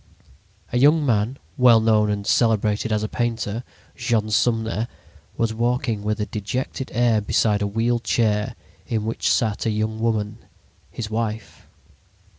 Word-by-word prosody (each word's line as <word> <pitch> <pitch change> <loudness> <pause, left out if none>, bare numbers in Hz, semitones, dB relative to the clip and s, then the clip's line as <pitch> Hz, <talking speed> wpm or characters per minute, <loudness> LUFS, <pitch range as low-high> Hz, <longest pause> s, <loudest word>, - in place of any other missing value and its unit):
A 120 - +2
young 150 +3 +5
man, 115 +1 +1 0.2
well 125 -3 +7
known 110 -1 +3
and 100 -1 -2
celebrated 110 -1 +2
as 105 0 0
a - - -1
painter, 115 -1 -2 0.3
Jean 115 -3 0
Sumner, 115 0 +1 0.5
was 115 -1 0
walking 120 -1 0
with 105 +1 -2
a 105 - 0
dejected 125 +6 -4
air 120 -2 +2
beside 105 0 +1
a 100 - +1
wheeled 115 +3 0
chair 105 -3 +1 0.3
in 110 -2 -1
which 115 - 0
sat 110 -1 0
a - - +3
young 110 +1 -1
woman, 110 -1 -1 0.5
his 110 -2 -6
wife. 110 -1 -4
110 Hz, 145 wpm, -23 LUFS, 105-120 Hz, 0.5 s, well